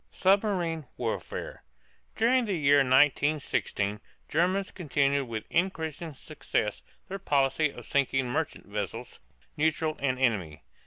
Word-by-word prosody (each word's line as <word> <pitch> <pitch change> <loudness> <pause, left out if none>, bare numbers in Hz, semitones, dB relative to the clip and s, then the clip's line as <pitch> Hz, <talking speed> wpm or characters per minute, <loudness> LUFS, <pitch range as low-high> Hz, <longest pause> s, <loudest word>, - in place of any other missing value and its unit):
SUBMARINE 185 - +1
WARFARE. 115 -3 -4 0.5
During 245 +2 +3
the 200 -3 -1
year 145 -1 +5
1916 135 -6 +2 0.3
Germans 185 +5 +1
continued 140 -4 +1
with 110 -2 -5
increasing 165 -3 -1
success 130 -7 -3 0.3
their 195 +1 -5
policy 145 -2 +2
of - - -11
sinking 135 -2 +1
merchant 155 +3 -2
vessels, 100 -2 -5 0.4
neutral 155 0 +1
and 130 -2 0
enemy. 100 - 0
145 Hz, 110 wpm, -28 LUFS, 130-170 Hz, 0.5 s, year